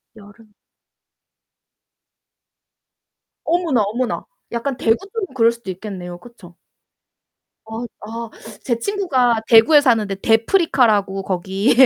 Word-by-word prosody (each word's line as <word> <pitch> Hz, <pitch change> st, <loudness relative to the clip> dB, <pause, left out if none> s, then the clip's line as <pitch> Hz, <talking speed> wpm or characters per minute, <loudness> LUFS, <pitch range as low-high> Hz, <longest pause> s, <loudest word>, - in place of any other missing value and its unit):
여름. 210 Hz, +1 st, -17 dB, 2.9 s
어머나, 330 Hz, -8 st, +1 dB
어머나. 235 Hz, +5 st, -2 dB, 0.3 s
약간 245 Hz, +3 st, -3 dB
대구 225 Hz, -2 st, +3 dB, 0.2 s
쪽은 395 Hz, -9 st, -4 dB
그럴 230 Hz, -3 st, +4 dB
수도 235 Hz, -5 st, -7 dB
있겠네요, 180 Hz, -2 st, -7 dB
그쵸? 185 Hz, -6 st, -16 dB, 1.1 s
아. 220 Hz, +2 st, -6 dB, 0.2 s
아 230 Hz, +1 st, -6 dB, 0.3 s
제 235 Hz, -3 st, 0 dB
친구가 255 Hz, -, +1 dB
대구에 240 Hz, +7 st, +7 dB
사는데 225 Hz, -7 st, +2 dB
"대프리카라고, 225 Hz, -, +2 dB
거기. 190 Hz, +5 st, 0 dB
230 Hz, 225 characters per minute, -20 LUFS, 205-255 Hz, 2.9 s, 대구에